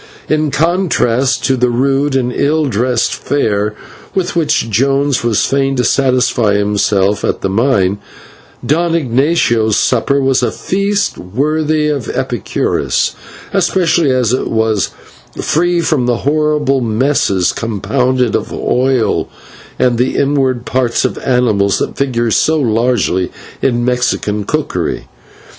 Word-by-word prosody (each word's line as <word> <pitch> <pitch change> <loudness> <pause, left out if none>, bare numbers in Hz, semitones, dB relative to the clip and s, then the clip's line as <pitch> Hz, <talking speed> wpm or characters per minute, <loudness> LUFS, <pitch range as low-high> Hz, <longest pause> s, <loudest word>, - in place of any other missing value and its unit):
In 155 0 +1
contrast 145 -6 +1
to 135 - +2
the 125 -1 +1
rude 135 +3 +1
and 125 -2 0
ill 150 +2 +1
dressed 120 -1 0
fare 105 -7 -1 0.4
with 185 -2 -1
which 155 -7 +1
Jones 135 +4 +1
was 115 -3 +1
fain 135 0 0
to 125 - 0
satisfy 125 -4 +2
himself 100 -1 +1
at - - -1
the 95 - -1
mine, 100 -4 +1 0.7
Don 165 +3 +1
Ignatio's 125 -6 +1
supper 135 +3 +1
was 135 -1 +1
a - - +1
feast 200 +2 -1
worthy 150 - 0
of 145 -6 -2
Epicurus, - - -1 0.4
especially 175 -4 +2
as 125 -3 +1
it 130 - -1
was 110 -3 0 0.5
free 175 +2 +1
from 145 -7 0
the 120 -1 +1
horrible 150 -2 +1
messes, 110 -5 +1
compounded 125 +2 -1
of - - -3
oil 130 -2 0 0.5
and 120 -2 +1
the 125 - 0
inward 135 -3 0
parts 125 -2 0
of - - -2
animals, 110 -6 +1
that - - -3
figure 120 -4 -1
so 160 +8 +2
largely 115 -6 0 0.3
in 120 -2 +1
Mexican 125 -4 -1
cookery. - - -2
130 Hz, 125 wpm, -14 LUFS, 115-145 Hz, 0.7 s, to